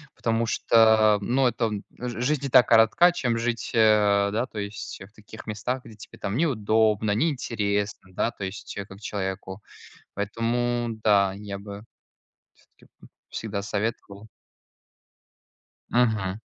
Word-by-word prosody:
Потому 115 Hz, 0 st, 0 dB
что 110 Hz, -2 st, +4 dB
ну 130 Hz, +5 st, +2 dB
это 120 Hz, -1 st, 0 dB
он 105 Hz, -2 st, -4 dB, 0.2 s
ж 120 Hz, -1 st, -5 dB
жизнь 140 Hz, +2 st, 0 dB
и -, -, -2 dB
так 125 Hz, -2 st, +6 dB
коротка, 115 Hz, +10 st, +6 dB
чем 120 Hz, -8 st, -1 dB
жить, 115 Hz, 0 st, -2 dB
э, 105 Hz, -3 st, +4 dB
да 115 Hz, +4 st, 0 dB
то 110 Hz, -, -8 dB
есть 100 Hz, +1 st, -6 dB
в 95 Hz, +2 st, -11 dB
таких 110 Hz, 0 st, -13 dB
местах, 125 Hz, +4 st, -3 dB
где 115 Hz, -3 st, -13 dB
тебе 105 Hz, -, -14 dB
там 100 Hz, +4 st, -3 dB
неудобно, 110 Hz, -7 st, +2 dB
неинтересно, 105 Hz, -, -2 dB
да 115 Hz, -, 0 dB
то -, -, -9 dB
есть 95 Hz, +2 st, -8 dB
как 95 Hz, +1 st, -13 dB
человеку. 95 Hz, -1 st, -5 dB, 0.5 s
Поэтому 120 Hz, +3 st, -1 dB, 0.2 s
да 100 Hz, -2 st, +4 dB
я 100 Hz, -1 st, -7 dB
бы 100 Hz, 0 st, -9 dB, 0.9 s
всё-таки -, -, -22 dB, 0.2 s
б -, -, -15 dB, 0.2 s
всегда 105 Hz, -3 st, -4 dB
советовал. 105 Hz, 0 st, -4 dB, 1.6 s
Мгм. 110 Hz, -5 st, +1 dB
110 Hz, 140 wpm, -25 LUFS, 100-120 Hz, 1.6 s, так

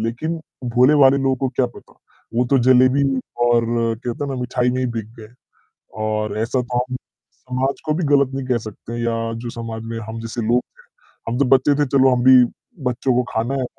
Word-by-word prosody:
लेकिन 120 Hz, +9 st, -2 dB, 0.4 s
भोले-भाले 135 Hz, +2 st, +5 dB
लोगों 135 Hz, -1 st, +1 dB
को 135 Hz, +1 st, -1 dB
क्या 130 Hz, -, +3 dB
पता? 120 Hz, -, -15 dB, 0.4 s
वो 120 Hz, +2 st, +2 dB
तो 135 Hz, -, +5 dB
जलेबी 130 Hz, +2 st, +5 dB, 0.4 s
और 120 Hz, -1 st, +3 dB, 0.4 s
क्या 120 Hz, -, -2 dB
कहते 145 Hz, -, -5 dB
हैं 140 Hz, -, -4 dB
ना -, -, -4 dB
मिठाई 125 Hz, 0 st, 0 dB
में 130 Hz, -, -2 dB
ही 130 Hz, -, 0 dB
बिक 110 Hz, -2 st, -3 dB
गए। 110 Hz, -1 st, -11 dB, 0.8 s
और 110 Hz, -1 st, -2 dB
ऐसा 120 Hz, +3 st, 0 dB
तो 125 Hz, 0 st, -2 dB
हम 125 Hz, +1 st, -2 dB
समाज 130 Hz, +1 st, -5 dB
को 155 Hz, -, +1 dB
भी 170 Hz, +2 st, -1 dB
गलत 140 Hz, -2 st, +3 dB
नहीं 135 Hz, -1 st, -4 dB
कह 125 Hz, -2 st, +1 dB
सकते 115 Hz, +2 st, -8 dB
या 115 Hz, -1 st, 0 dB, 0.3 s
जो 120 Hz, -, -4 dB
समाज 115 Hz, -1 st, -6 dB
में 115 Hz, -, -4 dB
हम 115 Hz, +1 st, -6 dB
जैसे 115 Hz, +1 st, -5 dB
लोग 120 Hz, +1 st, +3 dB
थे, -, -, -25 dB, 0.5 s
हम 120 Hz, -, -2 dB
जब 140 Hz, -2 st, +2 dB
बच्चे 135 Hz, +2 st, +3 dB
थे -, -, +1 dB
चलो 135 Hz, 0 st, +5 dB
हम 125 Hz, -, -1 dB
भी 130 Hz, -1 st, +8 dB, 0.5 s
बच्चों 125 Hz, +1 st, 0 dB
को 125 Hz, -, +2 dB
खाना 115 Hz, +4 st, -1 dB
है, 135 Hz, -2 st, -1 dB
125 Hz, 215 wpm, -20 LUFS, 115-135 Hz, 0.8 s, भी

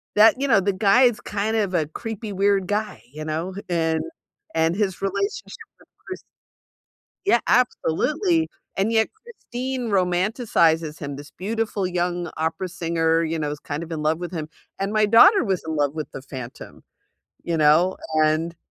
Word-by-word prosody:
that 225 Hz, +4 st, +6 dB
you 280 Hz, -, +1 dB
know, 225 Hz, -7 st, +5 dB
the 195 Hz, +1 st, 0 dB
guy 205 Hz, +6 st, +4 dB
is 240 Hz, -3 st, +3 dB
kind 210 Hz, +2 st, -2 dB
of 200 Hz, -4 st, 0 dB
a 155 Hz, -3 st, +1 dB
creepy 220 Hz, +5 st, -6 dB
weird 195 Hz, -1 st, +2 dB
guy, 210 Hz, +1 st, -2 dB
you 155 Hz, 0 st, -6 dB
know? 160 Hz, +4 st, -3 dB
H -, -, -6 dB
And 160 Hz, -2 st, 0 dB, 0.5 s
and 160 Hz, +1 st, +2 dB
his 195 Hz, -3 st, -1 dB
relationship 400 Hz, -, -2 dB, 0.3 s
with -, -, -67 dB
Chris 375 Hz, -, -7 dB, 1.0 s
Yeah, 315 Hz, -12 st, +4 dB
absolutely! 305 Hz, -, +1 dB, 0.3 s
And 200 Hz, +4 st, +1 dB
yet 220 Hz, 0 st, +3 dB
Christine 260 Hz, -, -5 dB
romanticizes 180 Hz, -, +1 dB
him, 140 Hz, -1 st, -5 dB
this 145 Hz, 0 st, -11 dB
beautiful 210 Hz, 0 st, -2 dB
young 175 Hz, -1 st, -2 dB
opera 160 Hz, +4 st, -2 dB
singer, 165 Hz, -1 st, 0 dB
you 165 Hz, 0 st, -2 dB
know, 150 Hz, -1 st, -2 dB
is 150 Hz, -, -6 dB
kind 145 Hz, +3 st, -5 dB
of 170 Hz, -, -10 dB
in 155 Hz, -2 st, -3 dB
love 155 Hz, +1 st, +2 dB
with 175 Hz, 0 st, -5 dB
him. 155 Hz, -3 st, -5 dB, 0.3 s
And 195 Hz, +2 st, -2 dB
my 215 Hz, 0 st, +4 dB
daughter 320 Hz, -, +7 dB
was 190 Hz, -3 st, 0 dB
in 160 Hz, -, -2 dB
love 145 Hz, -1 st, +1 dB
with 155 Hz, -, -4 dB
the -, -, -8 dB
Phantom, 130 Hz, -3 st, -9 dB, 0.6 s
you 170 Hz, -1 st, -1 dB
know? 155 Hz, +5 st, +4 dB, 0.3 s
And, 160 Hz, +2 st, 0 dB
185 Hz, 175 wpm, -23 LUFS, 160-220 Hz, 1.0 s, daughter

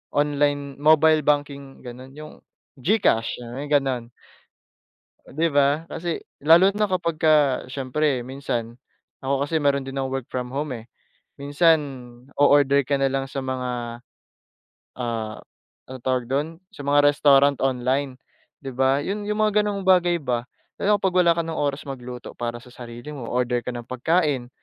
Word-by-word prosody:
online 145 Hz, -1 st, 0 dB
mobile 155 Hz, +1 st, +5 dB
banking, 140 Hz, -2 st, -2 dB
gano'n, 130 Hz, +2 st, -10 dB
yung 155 Hz, 0 st, -11 dB, 0.4 s
GCash, 125 Hz, -, +1 dB
yung 130 Hz, +5 st, -6 dB
ganun. 135 Hz, -5 st, 0 dB, 1.2 s
Di 160 Hz, +4 st, 0 dB
ba? 145 Hz, +3 st, +2 dB
Kasi 170 Hz, 0 st, -4 dB, 0.2 s
lalo 170 Hz, +6 st, +6 dB
na 210 Hz, -1 st, 0 dB
kapagka 155 Hz, -6 st, +2 dB
siyempre 135 Hz, -1 st, -1 dB
minsan 120 Hz, -4 st, -4 dB, 0.5 s
ako 140 Hz, +1 st, 0 dB
kasi 160 Hz, 0 st, -1 dB
meron 140 Hz, -1 st, +1 dB
din 135 Hz, -, -7 dB
akong 135 Hz, -1 st, -2 dB
work 125 Hz, -, -10 dB
from 125 Hz, -1 st, -5 dB
home 140 Hz, 0 st, -3 dB
eh. 115 Hz, -2 st, -8 dB, 0.5 s
Minsan, 145 Hz, +4 st, +3 dB, 0.6 s
o-order 140 Hz, -1 st, +4 dB
ka 140 Hz, +2 st, -1 dB
nalang 135 Hz, 0 st, -1 dB
sa -, -, -5 dB
mga, 125 Hz, -2 st, -4 dB, 1.0 s
ah, 115 Hz, -3 st, -3 dB, 0.5 s
anong 130 Hz, -2 st, -9 dB
tawag 130 Hz, -2 st, 0 dB
dun, 140 Hz, +3 st, 0 dB, 0.2 s
sa 145 Hz, -, -10 dB
mga 145 Hz, 0 st, +4 dB
restaurant 140 Hz, -1 st, +4 dB
online, 130 Hz, +1 st, 0 dB, 0.5 s
di 135 Hz, -, -6 dB
ba? 135 Hz, +2 st, +1 dB
Yun 205 Hz, +6 st, -4 dB
yung 210 Hz, +1 st, -1 dB
mga 210 Hz, -1 st, +3 dB
gano'ng 200 Hz, -1 st, -2 dB
bagay 175 Hz, -2 st, +3 dB
ba 125 Hz, -3 st, -2 dB, 0.4 s
lalo 210 Hz, +1 st, +3 dB
na -, -, -20 dB
'pag 190 Hz, -2 st, +1 dB
wala 170 Hz, -2 st, +4 dB
ka -, -, +2 dB
ng 165 Hz, -, -4 dB
oras 145 Hz, -1 st, -2 dB
magluto 125 Hz, -3 st, -8 dB
para 120 Hz, 0 st, -4 dB
sa 125 Hz, +1 st, -15 dB
sarili 120 Hz, +4 st, -9 dB
mo, 125 Hz, -5 st, -7 dB
o-order 125 Hz, 0 st, 0 dB
ka -, -, -6 dB
ng 120 Hz, -1 st, -7 dB
pagkain 135 Hz, 0 st, 0 dB
140 Hz, 155 wpm, -23 LUFS, 125-155 Hz, 1.2 s, lalo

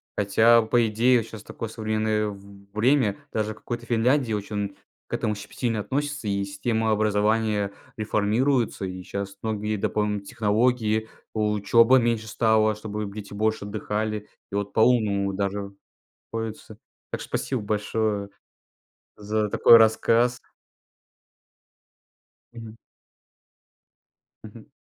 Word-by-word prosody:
Хотя, 110 Hz, +4 st, +5 dB
по 115 Hz, +1 st, +2 dB
идее, 120 Hz, +4 st, +3 dB
вот 115 Hz, -, -5 dB
щас 110 Hz, -2 st, -9 dB
такое 115 Hz, -, -6 dB
современное 110 Hz, -1 st, -1 dB
в 100 Hz, -1 st, -11 dB
время. 115 Hz, -2 st, +2 dB, 0.2 s
Даже 110 Hz, -1 st, -1 dB
в -, -, -18 dB
какой-то 120 Hz, +1 st, -6 dB
Финляндии 120 Hz, +1 st, +2 dB
очень 100 Hz, -1 st, -3 dB, 0.3 s
к -, -, -10 dB
этому 105 Hz, -, 0 dB
щепетильно 115 Hz, +2 st, -3 dB
относятся, 145 Hz, +2 st, -3 dB
и 100 Hz, -1 st, 0 dB
система 110 Hz, +3 st, -1 dB
образования 105 Hz, -1 st, +1 dB, 0.3 s
реформируется, 110 Hz, +2 st, +1 dB
и 90 Hz, 0 st, -6 dB
щас 100 Hz, +1 st, -6 dB
многие 110 Hz, -1 st, -2 dB
дополнительные 105 Hz, 0 st, -1 dB
технологии. 110 Hz, +1 st, +1 dB, 0.2 s
Учеба 110 Hz, +4 st, +4 dB
меньше 115 Hz, -2 st, 0 dB
стала, 110 Hz, 0 st, +2 dB
чтобы 105 Hz, -1 st, -5 dB
дети 100 Hz, -1 st, -8 dB
больше 110 Hz, 0 st, -1 dB
отдыхали. 105 Hz, 0 st, -3 dB, 0.2 s
И -, -, -4 dB
вот 100 Hz, 0 st, -2 dB
по-умному 110 Hz, -4 st, +2 dB
даже 100 Hz, 0 st, -3 dB, 0.6 s
приходится 110 Hz, -1 st, -6 dB, 0.3 s
Так -, -, -4 dB
что -, -, -10 dB
спасибо 130 Hz, -5 st, -2 dB
большое 105 Hz, 0 st, -1 dB, 0.9 s
за 105 Hz, 0 st, -1 dB
такой 115 Hz, +3 st, +7 dB
рассказ. 115 Hz, +2 st, +3 dB, 2.1 s
Мгм. 115 Hz, -1 st, -10 dB, 1.7 s
Мгм. -, -, -13 dB
110 Hz, 115 wpm, -25 LUFS, 105-115 Hz, 2.1 s, такой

